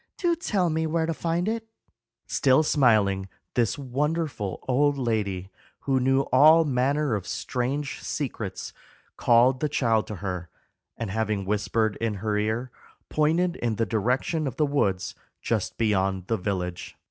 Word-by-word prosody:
Do 345 Hz, -2 st, +1 dB
tell 200 Hz, -, 0 dB
me 160 Hz, +1 st, 0 dB
where 160 Hz, +1 st, 0 dB
to 165 Hz, -, -1 dB
find 170 Hz, +3 st, -1 dB
it." 225 Hz, 0 st, -2 dB, 0.6 s
Still 135 Hz, +3 st, +3 dB
smiling, 105 Hz, -10 st, +3 dB, 0.2 s
this 120 Hz, -3 st, +1 dB
wonderful 140 Hz, -, -2 dB
old 140 Hz, +2 st, +2 dB
lady, 105 Hz, -7 st, -2 dB, 0.3 s
who 135 Hz, -1 st, +1 dB
knew 135 Hz, +1 st, +3 dB
all 155 Hz, +5 st, +7 dB
manner 140 Hz, +1 st, +1 dB
of 100 Hz, -4 st, -3 dB
strange 135 Hz, +3 st, -3 dB
secrets, 115 Hz, -8 st, -4 dB, 0.4 s
called 125 Hz, +2 st, +4 dB
the 150 Hz, -, 0 dB
child 115 Hz, -6 st, +1 dB
to 105 Hz, -, -5 dB
her, 90 Hz, -2 st, -5 dB, 0.5 s
and 115 Hz, -4 st, -4 dB
having 105 Hz, -2 st, -1 dB
whispered 105 Hz, +1 st, 0 dB
in 115 Hz, -2 st, -1 dB
her 105 Hz, +1 st, -2 dB
ear, 110 Hz, +4 st, -1 dB, 0.4 s
pointed 165 Hz, +4 st, +1 dB
in 115 Hz, -2 st, -1 dB
the 115 Hz, -, 0 dB
direction 125 Hz, -, 0 dB
of 130 Hz, -, -4 dB
the 150 Hz, -, +2 dB
woods 100 Hz, -11 st, 0 dB, 0.3 s
just -, -, -2 dB
beyond 95 Hz, -4 st, +1 dB
the 115 Hz, +3 st, 0 dB
village. 90 Hz, -3 st, -4 dB
125 Hz, 145 wpm, -26 LUFS, 105-150 Hz, 0.6 s, all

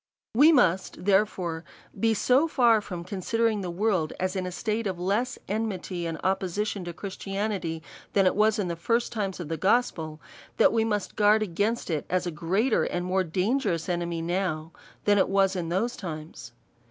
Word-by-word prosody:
We 290 Hz, +8 st, +7 dB
must, 190 Hz, -, +2 dB
therefore, 190 Hz, -5 st, +1 dB, 0.4 s
be 225 Hz, -1 st, +3 dB
so 260 Hz, +9 st, +3 dB
far 235 Hz, -7 st, +4 dB
from 175 Hz, -4 st, -6 dB
considering 210 Hz, +4 st, 0 dB
the 180 Hz, -, -4 dB
world 180 Hz, -3 st, 0 dB
as 185 Hz, +1 st, -1 dB
in 185 Hz, -1 st, -2 dB
a -, -, -4 dB
state 215 Hz, +3 st, -2 dB
of 185 Hz, -2 st, -3 dB
less 215 Hz, +8 st, 0 dB
enmity 190 Hz, -5 st, -3 dB
and 165 Hz, -1 st, -4 dB
opposition 190 Hz, +1 st, -1 dB
to 175 Hz, -, -4 dB
Christianity, 195 Hz, -3 st, -4 dB, 0.3 s
than 195 Hz, -1 st, +4 dB
it 185 Hz, -, +4 dB
was 215 Hz, +1 st, +3 dB
in 200 Hz, -4 st, -1 dB
the 170 Hz, -, -2 dB
first 230 Hz, +9 st, 0 dB
times 200 Hz, -5 st, -3 dB
of 175 Hz, -, -5 dB
the 165 Hz, +1 st, -3 dB
gos 235 Hz, +9 st, +3 dB
pel, 155 Hz, -2 st, -7 dB, 0.4 s
that -, -, +5 dB
Ave 225 Hz, -1 st, +2 dB
must 210 Hz, -3 st, -2 dB
guard 215 Hz, +1 st, +4 dB
against 205 Hz, +3 st, -1 dB
it 155 Hz, -3 st, -2 dB
as 185 Hz, +1 st, 0 dB
a 175 Hz, -, -2 dB
greater 190 Hz, -, +1 dB
and 175 Hz, 0 st, -2 dB
more 185 Hz, +1 st, +1 dB
dangerous 185 Hz, -, 0 dB
enemy 170 Hz, -2 st, -2 dB
now, 170 Hz, -2 st, -2 dB, 0.3 s
than 205 Hz, -1 st, +4 dB
it -, -, +2 dB
was 195 Hz, 0 st, +3 dB
in 170 Hz, -3 st, -3 dB
those 210 Hz, +8 st, 0 dB
times. 155 Hz, -, -7 dB
190 Hz, 185 wpm, -27 LUFS, 175-215 Hz, 0.4 s, We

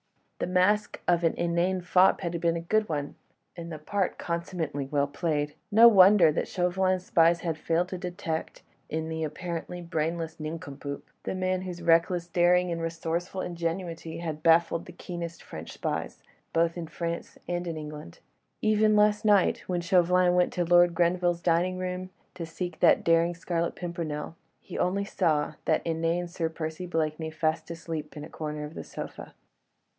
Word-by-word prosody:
The -, -, -1 dB
mask 185 Hz, +4 st, +2 dB
of 175 Hz, -1 st, +3 dB
the 165 Hz, -1 st, 0 dB
inane 175 Hz, +2 st, +1 dB
fop 180 Hz, +2 st, +4 dB
had 170 Hz, -2 st, -3 dB
been 170 Hz, 0 st, +2 dB
a -, -, -4 dB
good 215 Hz, +5 st, +1 dB
one, 145 Hz, -2 st, -3 dB, 0.4 s
and 170 Hz, -1 st, -7 dB
the 155 Hz, -, -5 dB
part 190 Hz, +5 st, -2 dB
consummately 170 Hz, -5 st, -3 dB
well 140 Hz, 0 st, +1 dB
played. 150 Hz, 0 st, -2 dB, 0.2 s
No 225 Hz, +3 st, +9 dB
wonder 190 Hz, -5 st, +7 dB
that 150 Hz, -, -2 dB
Chauvelin's 185 Hz, 0 st, 0 dB
spies 170 Hz, 0 st, +4 dB
had 165 Hz, -3 st, -2 dB
failed 170 Hz, +3 st, 0 dB
to 185 Hz, -, -5 dB
detect, 175 Hz, -3 st, -4 dB, 0.3 s
in 160 Hz, 0 st, -2 dB
the 160 Hz, 0 st, -3 dB
apparently 170 Hz, +2 st, -5 dB
brainless 165 Hz, -1 st, -3 dB
nincompoop, 145 Hz, -2 st, -6 dB
the -, -, -4 dB
man 185 Hz, 0 st, 0 dB
whose 180 Hz, -2 st, -6 dB
reckless 170 Hz, +1 st, +3 dB
daring 175 Hz, +1 st, +3 dB
and 165 Hz, 0 st, -2 dB
resourceful 170 Hz, +3 st, -3 dB
ingenuity 165 Hz, -1 st, -4 dB
had 160 Hz, -2 st, -5 dB
baffled 165 Hz, +1 st, +3 dB
the -, -, -8 dB
keenest 170 Hz, -1 st, -7 dB
French 80 Hz, +1 st, -8 dB
spies, -, -, -4 dB, 0.3 s
both 165 Hz, 0 st, +2 dB
in 170 Hz, -2 st, -5 dB
France 170 Hz, +2 st, -5 dB
and 175 Hz, 0 st, -2 dB
in 165 Hz, -2 st, -3 dB
England. 150 Hz, -, -8 dB, 0.5 s
Even 215 Hz, 0 st, +4 dB
last 210 Hz, +1 st, +4 dB
night 205 Hz, -3 st, +4 dB
when 180 Hz, -1 st, -1 dB
Chauvelin 180 Hz, 0 st, +3 dB
went 180 Hz, 0 st, +3 dB
to 175 Hz, -1 st, 0 dB
Lord 175 Hz, 0 st, +5 dB
Grenville's 175 Hz, 0 st, +1 dB
dining 180 Hz, +2 st, +2 dB
room 185 Hz, 0 st, -4 dB, 0.2 s
to 170 Hz, -3 st, -6 dB
seek 175 Hz, 0 st, -5 dB
that -, -, +5 dB
daring 170 Hz, +1 st, +3 dB
Scarlet 170 Hz, 0 st, -2 dB
Pimpernel, 165 Hz, -3 st, -4 dB, 0.2 s
he -, -, -8 dB
only 195 Hz, +3 st, +1 dB
saw 155 Hz, -5 st, 0 dB
that -, -, +1 dB
inane 165 Hz, +1 st, 0 dB
Sir 170 Hz, -1 st, -2 dB
Percy 160 Hz, +2 st, -5 dB
Blakeney 160 Hz, -1 st, -1 dB
fast 160 Hz, +1 st, -1 dB
asleep 160 Hz, -2 st, -6 dB
in 150 Hz, -, -6 dB
a 155 Hz, -, -9 dB
corner 150 Hz, -1 st, -5 dB
of 150 Hz, +1 st, -7 dB
the -, -, -6 dB
sofa. -, -, -8 dB
170 Hz, 170 wpm, -28 LUFS, 160-180 Hz, 0.5 s, No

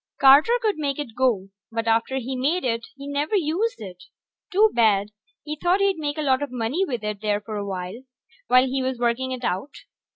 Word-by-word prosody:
Carter 285 Hz, -, +7 dB
could 430 Hz, -8 st, -1 dB
make 280 Hz, -2 st, -1 dB
it 285 Hz, -7 st, -5 dB
go, 235 Hz, -7 st, +1 dB, 0.2 s
but 230 Hz, 0 st, -2 dB
after 230 Hz, +4 st, +1 dB
he 260 Hz, +1 st, -3 dB
made 295 Hz, +8 st, 0 dB
it 230 Hz, -1 st, -1 dB
he 280 Hz, +1 st, -9 dB
never 290 Hz, +7 st, -1 dB
used 370 Hz, -, 0 dB
it. 185 Hz, -4 st, -10 dB, 0.5 s
Too 425 Hz, +3 st, +4 dB
bad; 210 Hz, -3 st, +3 dB, 0.3 s
he 300 Hz, 0 st, -4 dB
thought 355 Hz, +5 st, +1 dB
he'd 395 Hz, -2 st, +2 dB
make 295 Hz, 0 st, -3 dB
a 305 Hz, -, -1 dB
lot 265 Hz, -1 st, +2 dB
of 290 Hz, -, -3 dB
money 250 Hz, +9 st, -1 dB
with 245 Hz, -, -3 dB
it 210 Hz, -1 st, -4 dB
there 210 Hz, -1 st, 0 dB
for 210 Hz, +1 st, -7 dB
awhile, 195 Hz, +1 st, -5 dB, 0.5 s
while 255 Hz, +1 st, +5 dB
he 265 Hz, +1 st, -1 dB
was 260 Hz, -1 st, -2 dB
working 240 Hz, +2 st, 0 dB
it 255 Hz, -1 st, -5 dB
out. 200 Hz, +8 st, -2 dB
260 Hz, 205 wpm, -24 LUFS, 225-300 Hz, 0.5 s, Carter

